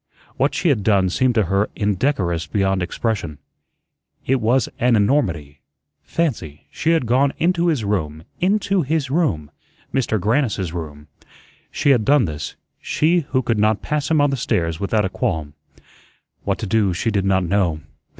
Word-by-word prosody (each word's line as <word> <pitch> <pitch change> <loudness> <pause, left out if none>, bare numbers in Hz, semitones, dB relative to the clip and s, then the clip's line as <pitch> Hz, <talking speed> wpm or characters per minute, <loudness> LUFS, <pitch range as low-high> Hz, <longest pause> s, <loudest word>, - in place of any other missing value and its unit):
What - - 0
she 175 - +1
had 130 -8 +2
done 95 -3 +2
seemed 125 +4 +1
to 110 - +3
her 100 +3 0
indecorous 95 - 0
beyond 95 +1 0
expression. 90 -4 -3 0.9
It 130 -1 +1
was 120 +4 +2
an 120 0 +3
enormity. 90 - 0 0.4
Fancy, 105 - -3
she 160 - -2
had 160 -7 +1
gone 130 +4 +2
into 175 +1 +1
his 150 -9 +1
room, 80 -6 -2 0.2
INTO 200 0 +1
HIS 145 -2 -1
ROOM 135 - 0 0.4
Mister 125 -4 +1
Grannis's 105 - 0
room. 75 -4 -7 0.6
She 140 - +1
had 120 -5 +3
done 140 0 +4
this 75 -2 -5 0.3
she 170 +3 +2
who 130 -2 +1
could 115 -3 0
not 110 0 +2
pass 150 -1 -2
him 160 -1 +3
on 145 -1 +3
the 135 - -1
stairs 85 -8 -1
without 105 +1 0
a - - -1
qualm. 80 -5 -2 0.9
What - - 0
to - - -5
do 100 -2 +1
she 115 +6 -1
did 100 -2 0
not 95 -1 +2
know. 85 -4 0
110 Hz, 165 wpm, -20 LUFS, 90-140 Hz, 0.9 s, done